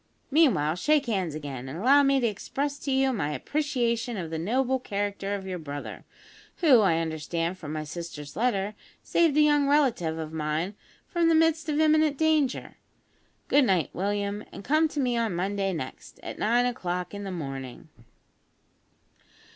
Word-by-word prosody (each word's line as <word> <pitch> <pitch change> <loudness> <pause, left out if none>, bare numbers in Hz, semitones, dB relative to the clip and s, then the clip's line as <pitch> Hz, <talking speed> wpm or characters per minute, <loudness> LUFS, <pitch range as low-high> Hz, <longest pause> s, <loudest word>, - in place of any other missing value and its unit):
Meanwhile, 235 - +3
shake 295 - +2
hands 190 - -1
again, 135 -4 -6
and 145 - -6
allow 265 +9 +5
me 275 -1 +3
to 245 - 0
express 275 +7 -2
to 280 - -3
you 265 0 +2
my 150 -10 -2
appreciation 240 - -1
of 170 -4 -5
the 160 - -3
noble 260 +8 +1
character 200 -2 -3
of 195 -1 -6
your 185 -2 -4
brother, 145 -2 -7 0.5
who, 290 -9 +6
I 190 -6 +3
understand 165 +2 -2
from 150 -4 -7
my 155 0 -3
sister's 150 -2 -7
letter, 210 -2 0 0.3
saved 330 -4 +2
a - - +6
young 295 -1 +4
relative 250 - +2
of 160 -1 -6
mine 160 +4 -2 0.3
from 340 -1 +2
the 325 - +4
midst 320 -1 +2
of 300 0 0
imminent 310 -2 +3
danger. 310 -4 +1 0.7
Good 285 -1 +4
night, 185 -7 +1
William, 205 +2 -2
and - - -9
come 310 +6 +3
to 300 - -5
me 250 -3 +1
on 225 -6 0
Monday 195 +2 -1
next, 130 -7 -7
at - - -7
nine 240 +3 +3
o'clock 180 -7 -3
in 205 0 -6
the 195 - -5
morning." 135 -5 -6
205 Hz, 170 wpm, -27 LUFS, 165-275 Hz, 0.7 s, who